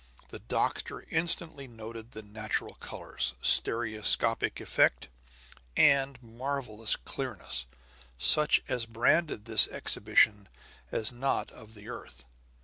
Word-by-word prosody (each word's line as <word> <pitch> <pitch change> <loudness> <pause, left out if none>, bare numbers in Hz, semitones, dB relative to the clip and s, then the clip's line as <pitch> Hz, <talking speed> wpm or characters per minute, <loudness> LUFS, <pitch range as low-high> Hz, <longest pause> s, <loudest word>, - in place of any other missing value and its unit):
The - - -9
doctor - - -3
instantly 160 -3 -3
noted 115 -1 -10
the 110 - -9
natural 105 +1 -5
colors, - - -5
stereoscopic 115 0 +4
effect, - - +1 0.7
and 140 -2 +3
marvelous 115 -2 -3
clearness, 65 - -5 0.5
such 150 - +5
as 115 -2 -3
branded 115 +2 0
this 110 -2 +4
exhibition 105 -3 +1 0.4
as 110 - -2
not 130 +3 -3
of 110 -2 -15
the 105 0 -14
earth. - - -10
115 Hz, 105 wpm, -29 LUFS, 110-135 Hz, 0.7 s, such